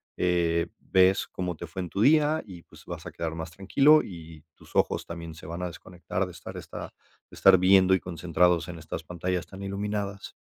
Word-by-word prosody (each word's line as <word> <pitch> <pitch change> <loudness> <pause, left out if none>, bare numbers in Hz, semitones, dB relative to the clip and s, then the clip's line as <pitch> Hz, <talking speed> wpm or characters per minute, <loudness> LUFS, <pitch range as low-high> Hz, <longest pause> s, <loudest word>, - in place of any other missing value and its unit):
eh, 85 -2 +1
ves 95 +1 +3
cómo 90 -1 -4
te 85 - -7
fue 90 +3 -5
en 90 - -5
tu 100 - -2
día 150 +4 +4
y, 90 -5 -11
pues, - - -18
vas - - -7
a - - -6
quedar 80 -1 -4
más 80 0 -6
tranquilo 135 - +5
y 80 -4 -11
tus - - -19
ojos - - +1
también 85 -1 -7
se 80 - -12
van 85 +3 -6
a 90 - -1
desconectar 90 +2 -4
de 90 - -9
estar 90 - -10
esta - - -8 0.4
de - - -14
estar 95 -1 +7
viendo 95 +1 +5
y 95 - +4
concentrados 90 0 +1
en 85 -1 -7
estas 80 +1 -6
pantallas 90 +1 -3
tan 95 0 -11
iluminadas. 100 0 -4
90 Hz, 205 wpm, -27 LUFS, 85-95 Hz, 0.4 s, estar